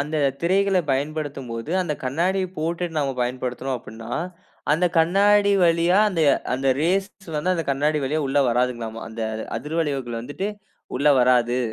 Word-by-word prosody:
அந்த 150 Hz, +2 st, -2 dB, 0.2 s
திரைகள 190 Hz, +2 st, +2 dB
பயன்படுத்தும்போது, 140 Hz, -3 st, -3 dB
அந்த 165 Hz, -4 st, -2 dB
கண்ணாடியை 180 Hz, +8 st, 0 dB
போட்டுட்டு 170 Hz, +1 st, -2 dB
நம்ம 140 Hz, -2 st, 0 dB
பயன்படுத்தினோம் 125 Hz, +1 st, -3 dB
அப்படினா, 110 Hz, +1 st, -10 dB, 0.6 s
அந்த 175 Hz, +4 st, +3 dB
கண்ணாடி 200 Hz, +4 st, +4 dB
வழியா 170 Hz, +3 st, +3 dB
அந்த 170 Hz, -, -1 dB, 0.3 s
அந்த 135 Hz, +1 st, 0 dB
ரேஸ் 190 Hz, +4 st, +1 dB, 0.3 s
வந்து 170 Hz, +5 st, +1 dB
அந்த 165 Hz, -, -2 dB
கண்ணாடி 150 Hz, +3 st, +1 dB
வழியா 155 Hz, +4 st, 0 dB
உள்ளே 140 Hz, +1 st, +2 dB
வராதுங்களாமா. 120 Hz, -2 st, -1 dB
அந்த 115 Hz, +1 st, -8 dB, 0.4 s
அதிர்வளைவுகள் 140 Hz, -4 st, -2 dB
வந்துவிட்டு 145 Hz, -, -4 dB, 0.5 s
உள்ளே 145 Hz, +2 st, +4 dB
வராது. 125 Hz, -1 st, +3 dB
150 Hz, 135 wpm, -23 LUFS, 125-170 Hz, 0.6 s, கண்ணாடி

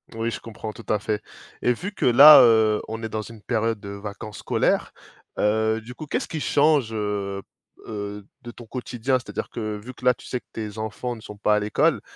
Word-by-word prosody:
Oui, 115 Hz, +1 st, -2 dB
je -, -, -5 dB
comprends 110 Hz, -1 st, -8 dB
tout 115 Hz, -, -12 dB
à 105 Hz, -, +3 dB
fait. 105 Hz, 0 st, -2 dB, 0.4 s
Et 125 Hz, -, +3 dB
vu 180 Hz, -, -6 dB
que -, -, -2 dB
là, 140 Hz, +4 st, +10 dB
heu, 110 Hz, -3 st, +4 dB
on 110 Hz, +1 st, -6 dB
est 110 Hz, -, -3 dB
dans 110 Hz, 0 st, -3 dB
une 110 Hz, 0 st, -11 dB
période 115 Hz, 0 st, -1 dB
de 100 Hz, 0 st, -9 dB
vacances 100 Hz, +1 st, -7 dB
scolaires, -, -, 0 dB, 0.5 s
heu, 110 Hz, +1 st, +1 dB
du 120 Hz, +3 st, -10 dB
coup 155 Hz, +3 st, -9 dB
qu'est -, -, 0 dB
ce -, -, -6 dB
qui 160 Hz, -, -4 dB
change, 145 Hz, -5 st, +2 dB
heu 100 Hz, -2 st, -3 dB, 0.5 s
heu, 105 Hz, -1 st, -6 dB, 0.2 s
de 120 Hz, -1 st, -8 dB
ton 120 Hz, -, -12 dB
quotidien? 125 Hz, +2 st, -2 dB
C'est -, -, -14 dB
à -, -, -7 dB
dire -, -, -4 dB
que, 110 Hz, -2 st, -4 dB
vu 120 Hz, +5 st, -10 dB
que -, -, -17 dB
là 125 Hz, -, +6 dB
tu -, -, -15 dB
sais 125 Hz, -, -3 dB
que -, -, -52 dB
tes 110 Hz, -1 st, -6 dB
enfants 110 Hz, +3 st, -4 dB
ne 110 Hz, -, -12 dB
sont 105 Hz, -1 st, -10 dB
pas 105 Hz, 0 st, +2 dB
à -, -, +2 dB
l'école. 105 Hz, -, +1 dB
110 Hz, 235 wpm, -24 LUFS, 105-120 Hz, 0.5 s, là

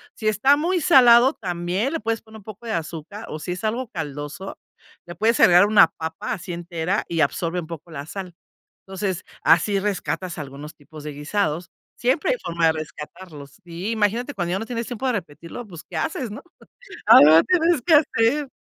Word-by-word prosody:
Si 220 Hz, -, -4 dB
está 215 Hz, +7 st, +4 dB
muy 345 Hz, +3 st, 0 dB
salado, 255 Hz, -5 st, +6 dB
también 180 Hz, -, -2 dB
le -, -, -1 dB
puedes 225 Hz, +1 st, -2 dB
poner 220 Hz, 0 st, -14 dB
un -, -, -18 dB
poco 215 Hz, +3 st, -11 dB
de 225 Hz, -, -3 dB
azúcar 170 Hz, +6 st, -6 dB
o 155 Hz, -, -6 dB
si 155 Hz, -, -5 dB
es 180 Hz, -, -8 dB
algo 235 Hz, +4 st, -2 dB
caldoso, 150 Hz, +1 st, -6 dB, 0.5 s
le 175 Hz, -, -9 dB
puedes 225 Hz, +2 st, +1 dB
agregar 180 Hz, +3 st, +7 dB
una 210 Hz, -5 st, +6 dB
papa 160 Hz, 0 st, -5 dB
así 185 Hz, -3 st, -7 dB
entera 170 Hz, +3 st, -2 dB
y 165 Hz, -1 st, -1 dB
absorbe 165 Hz, +4 st, 0 dB
un 165 Hz, -, -7 dB
poco 165 Hz, 0 st, -9 dB
la 140 Hz, -2 st, -7 dB
sal. 185 Hz, +2 st, -7 dB, 0.5 s
Entonces, 190 Hz, -2 st, -3 dB, 0.2 s
así 195 Hz, +4 st, +3 dB
rescatas 185 Hz, -3 st, -3 dB
algunos 145 Hz, +1 st, -8 dB
tipos 150 Hz, +1 st, -13 dB
de 150 Hz, -, -5 dB
guisados. 160 Hz, +2 st, -2 dB, 0.3 s
Siempre 260 Hz, -, +1 dB
hay -, -, 0 dB
forma 170 Hz, -1 st, 0 dB
de -, -, +4 dB
rescatarlos. 150 Hz, -2 st, -9 dB
Sí, 175 Hz, +5 st, -5 dB
imagínate 230 Hz, +5 st, 0 dB
cuando 175 Hz, -6 st, -3 dB
ya -, -, 0 dB
no 225 Hz, -, -5 dB
tienes 230 Hz, -1 st, -4 dB
tiempo 245 Hz, +1 st, -5 dB
de -, -, +2 dB
repetirlo, 175 Hz, +3 st, -7 dB
¿pues 170 Hz, -5 st, -11 dB
qué -, -, -10 dB
haces?, 265 Hz, -8 st, -3 dB
¿no?, 215 Hz, -, -8 dB, 0.6 s
algo 155 Hz, +3 st, +8 dB
tienes 340 Hz, -5 st, +2 dB
que 335 Hz, -, +3 dB
hacer. 285 Hz, -1 st, +2 dB
190 Hz, 190 wpm, -22 LUFS, 165-230 Hz, 0.6 s, algo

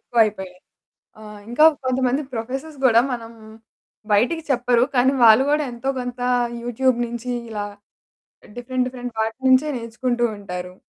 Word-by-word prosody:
ఎక్కువైపోయాయి. 210 Hz, -6 st, 0 dB, 0.6 s
ఆహ్, 210 Hz, -1 st, -11 dB
ఇంకా 265 Hz, +6 st, +3 dB, 0.2 s
కొంతమంది 255 Hz, +2 st, 0 dB
ప్రొఫెసర్స్ 265 Hz, +6 st, -5 dB
గూడా 235 Hz, -2 st, +6 dB
మనం 230 Hz, -1 st, -6 dB, 0.8 s
బయటికి 250 Hz, +11 st, +2 dB
చెప్పరు, 245 Hz, -2 st, +2 dB
కానీ 260 Hz, +2 st, +4 dB
వాళ్ళు 225 Hz, +3 st, +7 dB
కూడా 300 Hz, +1 st, +2 dB
ఎంతో 240 Hz, +3 st, -5 dB
కొంత 245 Hz, 0 st, -6 dB, 0.4 s
యూట్యూబ్ 245 Hz, +1 st, 0 dB
నుంచి 240 Hz, +1 st, -6 dB, 0.2 s
ఇలా 210 Hz, -2 st, -4 dB, 0.9 s
డిఫరెంట్, 250 Hz, +1 st, -2 dB
డిఫరెంట్ 245 Hz, -2 st, -7 dB
వాటి 220 Hz, +2 st, -2 dB
నుంచే 260 Hz, +4 st, +4 dB
నేర్చుకుంటూ 240 Hz, +1 st, -2 dB
ఉంటారు. 180 Hz, -2 st, -7 dB
245 Hz, 125 wpm, -21 LUFS, 225-255 Hz, 0.9 s, వాళ్ళు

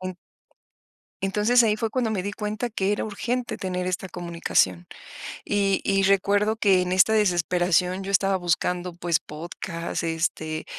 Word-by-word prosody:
En 185 Hz, 0 st, -5 dB, 1.1 s
Entonces, 210 Hz, +5 st, +3 dB
ahí 215 Hz, -2 st, +2 dB
fue 225 Hz, +1 st, -1 dB
cuando 235 Hz, 0 st, -1 dB
me 195 Hz, -3 st, -2 dB
di 205 Hz, -, -3 dB
cuenta 215 Hz, +3 st, -3 dB
que 200 Hz, -3 st, -1 dB
era 205 Hz, -, 0 dB
urgente 240 Hz, +4 st, -3 dB
tener 180 Hz, -1 st, -3 dB
esta 185 Hz, +1 st, -3 dB
comunicación. 170 Hz, -, 0 dB, 0.6 s
Y 200 Hz, -1 st, +1 dB
y 195 Hz, 0 st, +2 dB
recuerdo 200 Hz, +3 st, +2 dB
que 195 Hz, -4 st, +4 dB
en 180 Hz, 0 st, -2 dB
esta 190 Hz, +4 st, +4 dB
desesperación 180 Hz, -1 st, +2 dB
yo 195 Hz, -, -4 dB
estaba 195 Hz, 0 st, +3 dB
buscando, 175 Hz, 0 st, -1 dB
pues, 170 Hz, -1 st, 0 dB
podcast, 170 Hz, +2 st, -5 dB
este, 160 Hz, -1 st, -2 dB
190 Hz, 150 wpm, -25 LUFS, 175-210 Hz, 1.1 s, que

